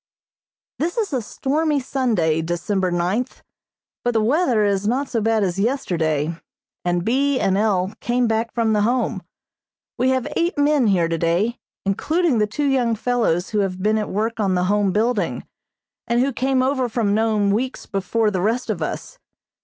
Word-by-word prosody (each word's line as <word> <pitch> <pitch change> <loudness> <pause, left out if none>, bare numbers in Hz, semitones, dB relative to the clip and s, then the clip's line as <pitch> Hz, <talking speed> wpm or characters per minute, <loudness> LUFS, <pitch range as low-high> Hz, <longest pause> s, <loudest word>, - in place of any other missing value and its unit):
This 340 +7 -1
is 420 -8 -1
a 255 - 0
stormy 295 +6 0
Sunday, 220 - 0
December 175 +3 -1
ninth, 180 +8 -2 0.6
but 245 -1 0
the - - +4
weather 245 -4 +2
is 200 0 0
not 265 +5 0
so 230 -3 -1
bad 220 0 +2
as 185 0 -1
yesterday, 165 - 0 0.5
and 175 0 0
B. 270 +3 +2
and 190 - +1
L. 200 -2 +1
came 245 0 +1
back 225 +1 0
from 225 -2 +1
the 210 - +2
Home. 235 -2 0 0.8
We 255 +1 +3
have 260 -2 0
eight 340 0 0
men 290 -4 +3
here 180 -5 +3
today, 170 +8 0 0.3
including 305 - +1
the 210 - +2
two 285 +8 -2
young 250 -4 +2
fellows 220 -7 0
who 210 - +1
have 185 -2 -2
been 215 +1 +2
at 210 - -3
work 225 +3 -2
on 195 -3 +1
the 180 - +1
Home 200 +1 +2
building, 220 +2 0 0.6
and 235 0 +1
who 270 +2 +1
came 260 +1 +1
over 260 -2 0
from 220 -3 0
Nome 215 -2 +2
weeks 250 +6 -2
before 210 +2 0
the 185 -3 -1
rest 225 +4 0
of 180 -6 -4
us. 155 - -5
220 Hz, 175 wpm, -21 LUFS, 195-255 Hz, 0.8 s, the